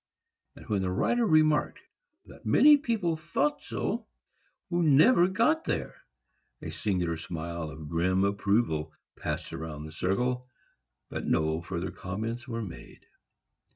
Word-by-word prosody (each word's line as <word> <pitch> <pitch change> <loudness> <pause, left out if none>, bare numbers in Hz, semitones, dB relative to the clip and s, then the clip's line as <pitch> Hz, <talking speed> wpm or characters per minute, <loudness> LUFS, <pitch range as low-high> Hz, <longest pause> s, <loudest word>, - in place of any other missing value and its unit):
And - - -13
when 100 -3 0
the 95 - -1
writer 235 - +1
remarked 155 -3 +3 0.5
that - - -15
many 300 0 +7
people 225 - 0
thought 170 - -1
so - - -3 0.6
who 175 0 +1
never 170 - +6
got 235 - +2
there, - - -2 0.7
a - - -6
singular 90 -5 -1
smile 85 0 -5
of 75 0 -9
grim 90 +4 +1
approval 100 -5 +1 0.2
passed - - -4
round 75 -2 -6
the 80 - -9
circle, 125 +10 -1 0.6
but - - -4
no 80 0 +1
further 85 +1 -4
comments 110 +7 -5
were 115 -2 -3
made. 80 - -11
100 Hz, 130 wpm, -29 LUFS, -, 0.7 s, many